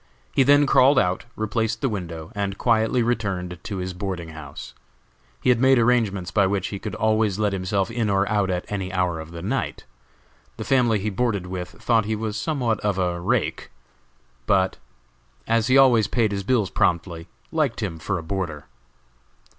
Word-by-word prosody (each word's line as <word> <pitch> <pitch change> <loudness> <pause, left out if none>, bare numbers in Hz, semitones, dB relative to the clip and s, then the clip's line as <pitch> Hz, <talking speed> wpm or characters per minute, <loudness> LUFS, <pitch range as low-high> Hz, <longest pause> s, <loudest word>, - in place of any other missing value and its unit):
He - - +2
then 145 +2 +5
crawled 135 +1 +5
out, 90 -1 +1
replaced 110 +1 -1
the 135 - +2
window, 85 -6 -5
and 100 -2 -3
quietly 115 +1 +2
returned 95 -7 -2
to 100 +1 -5
his 90 0 -4
boarding 90 -3 -5
house. 80 -3 -9 0.7
He - - +2
had 125 -2 +4
made 130 +1 +5
arrangements 110 -7 +1
by 100 +2 +3
which 95 -1 -1
he 100 - -5
could - - -5
always 110 -2 +1
let 105 -2 0
himself 95 +1 -1
in 115 -2 -1
or 100 0 +2
out 100 -2 +1
at 90 -1 -2
any 95 -2 -4
hour 90 -3 0
of 80 0 -8
the 85 0 -8
night. 130 +8 -3 0.7
The - - -4
family 125 -4 +3
he 105 +2 -2
boarded 100 -3 -1
with 90 -1 -5
thought 110 +5 +1
he 110 +1 -1
was 110 -1 -3
somewhat 115 -3 -1
of 105 -2 -1
a 90 -2 -1
"rake," 110 +6 -1 0.8
but 95 -2 +2 0.7
as 115 0 +1
he 130 +1 +5
always 120 -6 +5
paid 110 -3 +1
his 100 -1 -2
bills 105 -3 +1
promptly, 85 -2 0 0.2
liked 150 -8 0
him 85 -6 -4
for 95 +3 -2
a 85 - -6
boarder. 80 -4 -4
100 Hz, 180 wpm, -23 LUFS, 90-115 Hz, 0.8 s, then